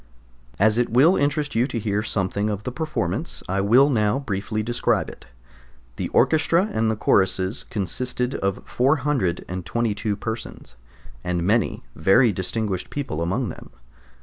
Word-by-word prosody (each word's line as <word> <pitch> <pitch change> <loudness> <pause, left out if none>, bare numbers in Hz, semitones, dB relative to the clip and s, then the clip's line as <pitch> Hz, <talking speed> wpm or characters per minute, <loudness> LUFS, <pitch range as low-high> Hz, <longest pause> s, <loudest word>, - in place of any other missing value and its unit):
As 110 +3 +3
it 120 - +1
will 140 - +5
interest 145 +1 0
you 120 +3 +2
to 120 - -4
hear 105 -2 -1
something 100 -1 -1
of 105 -1 -3
the 125 - -4
performance, 155 - -3
I 95 +1 0
will 120 +8 +5
now 110 -4 +2
briefly 110 -4 -3
describe 120 +2 0
it. - - -13 0.7
The - - -2
orchestra 165 +4 +3
and 110 -1 0
choruses 95 +2 +1
consisted 125 +5 -2
of 100 -6 -2
422 110 - 0
persons, 110 - -6 0.5
and 90 -1 -1
many 105 +2 +1
very 105 - +4
distinguished 95 +1 -3
people 135 - -4
among 100 +8 -1
them. - - -10
110 Hz, 135 wpm, -23 LUFS, 95-125 Hz, 0.7 s, will